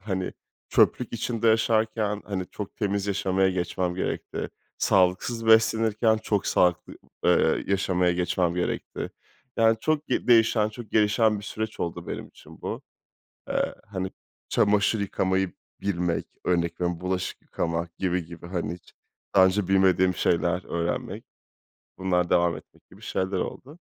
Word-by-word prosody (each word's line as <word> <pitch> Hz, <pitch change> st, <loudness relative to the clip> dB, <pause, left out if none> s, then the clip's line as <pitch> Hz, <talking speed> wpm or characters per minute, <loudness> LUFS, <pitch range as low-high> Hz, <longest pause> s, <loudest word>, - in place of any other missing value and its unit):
hani, 95 Hz, -2 st, -3 dB, 0.4 s
çöplük 125 Hz, -, +3 dB
içinde 115 Hz, -1 st, 0 dB
yaşarken, 110 Hz, -1 st, +1 dB
hani, 95 Hz, -3 st, -3 dB
çok 105 Hz, -2 st, -7 dB
temiz 100 Hz, -1 st, -1 dB
yaşamaya 95 Hz, -1 st, +1 dB
geçmem 90 Hz, 0 st, -1 dB
gerekti. 90 Hz, -, -3 dB, 0.3 s
Sağlıksız 95 Hz, +5 st, +2 dB
beslenirken 110 Hz, 0 st, +4 dB
çok 105 Hz, -2 st, -1 dB
sağlıklı, 90 Hz, -2 st, +2 dB, 0.3 s
eee, -, -, +3 dB
yaşamaya 90 Hz, -2 st, +2 dB
geçmem 90 Hz, 0 st, 0 dB
gerekti. 90 Hz, 0 st, -3 dB, 0.5 s
Yani 115 Hz, 0 st, +4 dB
çok 155 Hz, -1 st, 0 dB
ge 125 Hz, -, -1 dB
değişen, 115 Hz, -2 st, +5 dB
çok 110 Hz, -1 st, -10 dB
gelişen 105 Hz, 0 st, +3 dB
bir 100 Hz, -, -9 dB
süreç 110 Hz, +1 st, -5 dB
oldu 85 Hz, -, -3 dB
benim -, -, -5 dB
için -, -, -16 dB
bu. -, -, -4 dB, 0.7 s
Eee, -, -, 0 dB
hani, 95 Hz, -2 st, -4 dB, 0.4 s
çamaşır 105 Hz, +1 st, +2 dB
yıkamayı 95 Hz, -1 st, 0 dB, 0.3 s
bilmek, 90 Hz, -4 st, -1 dB, 0.2 s
örnek 85 Hz, -1 st, 0 dB
veriyorum, 90 Hz, -1 st, -1 dB
bulaşık 90 Hz, 0 st, -3 dB
yıkamak 85 Hz, 0 st, -3 dB
gibi 90 Hz, -2 st, 0 dB
gibi, 85 Hz, 0 st, -10 dB
hani, 85 Hz, -2 st, -3 dB
hiç 90 Hz, -, -18 dB, 0.4 s
daha 95 Hz, -1 st, +7 dB
önce 95 Hz, 0 st, 0 dB
bilmediğim 95 Hz, -1 st, +4 dB
şeyler 85 Hz, +1 st, +1 dB
öğrenmek, 85 Hz, 0 st, -3 dB, 0.7 s
bunlar 90 Hz, -2 st, +1 dB
devam 85 Hz, -1 st, +3 dB
etmek -, -, -17 dB
gibi -, -, -17 dB
şeyler 95 Hz, +1 st, -2 dB
oldu. 140 Hz, -, -5 dB
95 Hz, 135 wpm, -26 LUFS, 90-110 Hz, 0.7 s, daha